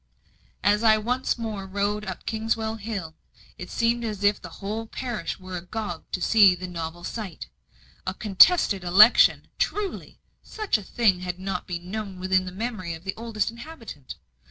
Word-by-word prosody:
As 205 Hz, +1 st, +3 dB
I 220 Hz, -1 st, +6 dB
once 250 Hz, +5 st, -1 dB
more 215 Hz, -4 st, -5 dB
rode 205 Hz, +2 st, -1 dB
up 190 Hz, -2 st, -6 dB
Kingswell 220 Hz, 0 st, -1 dB
Hill, 200 Hz, -7 st, -5 dB, 0.5 s
it 180 Hz, -, -7 dB
seemed 235 Hz, 0 st, +1 dB
as 210 Hz, -3 st, -4 dB
if 205 Hz, 0 st, +3 dB
the -, -, -8 dB
whole 215 Hz, +3 st, -4 dB
parish 235 Hz, -8 st, -4 dB
were 185 Hz, 0 st, -7 dB
agog 180 Hz, 0 st, -5 dB
to -, -, -2 dB
see 205 Hz, -5 st, +6 dB
the 180 Hz, +1 st, -7 dB
novel 170 Hz, -1 st, -6 dB
sight. 205 Hz, -6 st, -6 dB, 0.6 s
A 185 Hz, -, -2 dB
contested 205 Hz, -, +5 dB
election! 200 Hz, +6 st, +6 dB
truly, 415 Hz, -2 st, -2 dB, 0.2 s
such 430 Hz, -, -1 dB
a -, -, -10 dB
thing 195 Hz, -2 st, +2 dB
had 180 Hz, -1 st, -4 dB
not 190 Hz, -1 st, -4 dB
been 175 Hz, 0 st, -6 dB
known 205 Hz, -3 st, -5 dB
within 185 Hz, 0 st, +1 dB
the 185 Hz, -, -6 dB
memory 190 Hz, -4 st, -4 dB
of 160 Hz, -, -13 dB
the 190 Hz, 0 st, -3 dB
oldest 225 Hz, -2 st, -2 dB
inhabitant. 235 Hz, -, -10 dB
205 Hz, 165 wpm, -25 LUFS, 185-225 Hz, 0.6 s, I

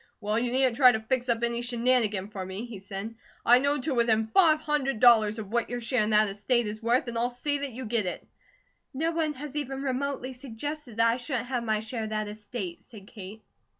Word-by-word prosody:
"Well, 210 Hz, +1 st, 0 dB
you 240 Hz, 0 st, -1 dB
needn't 260 Hz, -1 st, +2 dB
try 255 Hz, -3 st, +8 dB
to 220 Hz, -, -1 dB
fix 245 Hz, +3 st, -1 dB
up 235 Hz, 0 st, +1 dB
any 235 Hz, 0 st, +1 dB
shenanigan 235 Hz, -5 st, +1 dB
for 200 Hz, -3 st, -6 dB
me," 190 Hz, +5 st, -6 dB
he 230 Hz, -5 st, -9 dB
said. 200 Hz, +3 st, -7 dB, 0.3 s
"I 245 Hz, +1 st, +7 dB
know 285 Hz, +2 st, +1 dB
to 270 Hz, +3 st, -2 dB
within 230 Hz, -2 st, +2 dB
five 320 Hz, -5 st, +5 dB
hundred 290 Hz, -6 st, -1 dB
dollars 225 Hz, -3 st, +5 dB
of 210 Hz, -2 st, -7 dB
what 235 Hz, 0 st, 0 dB
your 245 Hz, 0 st, -3 dB
share 240 Hz, -1 st, +1 dB
of -, -, -2 dB
that 215 Hz, 0 st, +5 dB
estate 215 Hz, +4 st, +1 dB
is 215 Hz, +1 st, -6 dB
worth, 240 Hz, +3 st, +1 dB
and 235 Hz, -1 st, -2 dB
I'll 240 Hz, +1 st, +1 dB
see 285 Hz, +4 st, 0 dB
that 280 Hz, -1 st, -3 dB
you 255 Hz, +2 st, -7 dB
get 215 Hz, -3 st, +1 dB
it." 180 Hz, -, -5 dB, 0.7 s
"No 325 Hz, +5 st, 0 dB
one 320 Hz, -2 st, -1 dB
has 290 Hz, 0 st, -8 dB
even 270 Hz, -2 st, -3 dB
remotely 265 Hz, -1 st, -3 dB
suggested 255 Hz, +1 st, -7 dB
that 230 Hz, 0 st, +4 dB
I 230 Hz, +1 st, +2 dB
shouldn't 250 Hz, -1 st, -3 dB
have 245 Hz, -2 st, -1 dB
my 215 Hz, -2 st, 0 dB
share 225 Hz, 0 st, -4 dB
of -, -, -6 dB
that 215 Hz, -1 st, -2 dB
estate," 210 Hz, -4 st, -6 dB
said 215 Hz, -5 st, -14 dB
Kate. 210 Hz, 0 st, -10 dB
235 Hz, 230 wpm, -27 LUFS, 215-260 Hz, 0.7 s, try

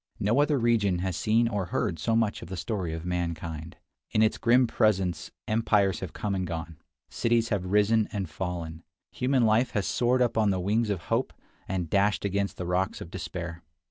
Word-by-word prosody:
No 115 Hz, +8 st, +3 dB
other 150 Hz, -1 st, +2 dB
region 115 Hz, -6 st, +2 dB
has 95 Hz, -3 st, -1 dB
seen 110 Hz, +7 st, +2 dB
or 105 Hz, -4 st, -1 dB
heard 80 Hz, -2 st, -2 dB
so 110 Hz, +8 st, +1 dB
much 115 Hz, -2 st, +1 dB
of -, -, -8 dB
the 95 Hz, -, -5 dB
story 95 Hz, -5 st, -3 dB
of 80 Hz, +1 st, -5 dB
mankind. 85 Hz, -2 st, -4 dB, 0.3 s
In 110 Hz, -, +3 dB
its 110 Hz, -, +1 dB
grim 120 Hz, +2 st, +4 dB
presence 95 Hz, -7 st, +1 dB, 0.2 s
empires 105 Hz, -4 st, +2 dB
have 95 Hz, -4 st, -5 dB
come 105 Hz, -2 st, -3 dB
and 95 Hz, -2 st, -1 dB
gone; 80 Hz, -1 st, -5 dB, 0.3 s
cities 115 Hz, -1 st, +1 dB
have 95 Hz, -4 st, -1 dB
risen 105 Hz, +2 st, +3 dB
and 100 Hz, -3 st, -3 dB
fallen; 85 Hz, -1 st, -5 dB, 0.3 s
human 130 Hz, -1 st, +2 dB
life 115 Hz, +3 st, +2 dB
has 100 Hz, -3 st, 0 dB
soared 125 Hz, +1 st, +2 dB
up 115 Hz, -2 st, 0 dB
on 105 Hz, -2 st, +3 dB
the 95 Hz, -2 st, +1 dB
wings 105 Hz, +5 st, +1 dB
of 100 Hz, -4 st, -1 dB
hope, -, -, -1 dB, 0.3 s
and 90 Hz, -3 st, -2 dB
dashed 100 Hz, +4 st, +1 dB
against 100 Hz, 0 st, -1 dB
the 90 Hz, -, -4 dB
rocks 90 Hz, +2 st, 0 dB
of 85 Hz, -, -9 dB
despair. 85 Hz, -1 st, -6 dB
100 Hz, 195 wpm, -27 LUFS, 90-115 Hz, 0.3 s, grim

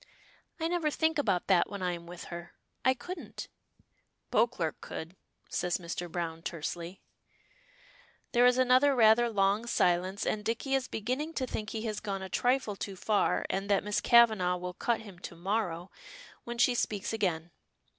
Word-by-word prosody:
"I 325 Hz, -, 0 dB
never 335 Hz, -3 st, +1 dB
think 320 Hz, +1 st, +1 dB
about 195 Hz, -10 st, +1 dB
that 185 Hz, -3 st, +3 dB
when 200 Hz, -2 st, -5 dB
I 180 Hz, -, +1 dB
am 170 Hz, -1 st, -7 dB
with 175 Hz, 0 st, -8 dB
her. 170 Hz, 0 st, -8 dB, 0.3 s
I 260 Hz, 0 st, +4 dB
couldn't." 355 Hz, +7 st, -7 dB, 0.8 s
"Beauclerk 185 Hz, -10 st, +1 dB
could," 165 Hz, +3 st, -7 dB, 0.3 s
says 175 Hz, -1 st, -1 dB
Mr. 175 Hz, -1 st, -5 dB
Browne, 165 Hz, -2 st, -3 dB
tersely. 170 Hz, +2 st, -5 dB, 1.3 s
There 245 Hz, 0 st, +5 dB
is 250 Hz, 0 st, +4 dB
another 255 Hz, +2 st, +5 dB
rather 235 Hz, 0 st, +5 dB
long 205 Hz, +2 st, +1 dB
silence, 185 Hz, 0 st, +1 dB
and 210 Hz, -, -1 dB
Dicky 235 Hz, +5 st, -2 dB
is 270 Hz, -1 st, +1 dB
beginning 260 Hz, +9 st, -3 dB
to 260 Hz, -, 0 dB
think 215 Hz, -3 st, -4 dB
he 220 Hz, -1 st, -4 dB
has 215 Hz, -2 st, -2 dB
gone 195 Hz, -2 st, -4 dB
a 190 Hz, -, -6 dB
trifle 245 Hz, -1 st, +1 dB
too 195 Hz, 0 st, -5 dB
far, 205 Hz, +2 st, +1 dB
and 195 Hz, +1 st, -2 dB
that 200 Hz, -, +3 dB
Miss 210 Hz, 0 st, 0 dB
Kavanagh 220 Hz, -7 st, +5 dB
will 180 Hz, 0 st, -5 dB
cut 235 Hz, +5 st, 0 dB
him 200 Hz, -5 st, -12 dB
to 175 Hz, -, -8 dB
morrow, 180 Hz, -1 st, -2 dB, 0.5 s
when 235 Hz, 0 st, -5 dB
she 245 Hz, +1 st, +4 dB
speaks 210 Hz, -3 st, -1 dB
again. 175 Hz, -6 st, -1 dB
205 Hz, 165 wpm, -30 LUFS, 180-240 Hz, 1.3 s, There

